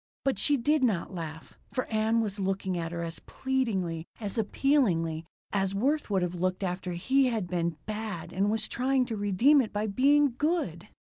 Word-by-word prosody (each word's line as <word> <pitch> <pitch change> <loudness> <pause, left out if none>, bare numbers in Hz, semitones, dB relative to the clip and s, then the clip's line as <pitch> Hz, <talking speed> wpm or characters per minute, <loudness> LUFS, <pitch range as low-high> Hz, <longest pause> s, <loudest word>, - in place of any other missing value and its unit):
But 270 - +1
she 290 -1 +4
did 290 +3 +2
not 200 -6 +1
laugh, 160 -2 -7 0.2
for 255 - -1
Ann 220 +1 +1
was 205 -2 -3
looking 190 -1 -1
at 165 -1 -3
her 170 0 -3
as 165 0 -5
pleadingly, 195 -11 -2
as 205 -3 -4
appealingly, 200 - +1 0.3
as 195 -1 0
Worth 280 +8 +1
would 190 -3 +1
have 175 0 -2
looked 185 +2 -1
after 180 0 -2
he 265 +10 +2
had 225 -6 -1
been 170 -2 -1
"bad" 210 -6 -5
and 195 +3 +1
was 220 +1 0
trying 260 +1 +1
to 235 -2 -4
redeem 210 +8 +4
it 225 - -4
by 210 +1 -1
being 275 +6 +4
"good." 295 - -1
205 Hz, 185 wpm, -29 LUFS, 180-255 Hz, 0.3 s, she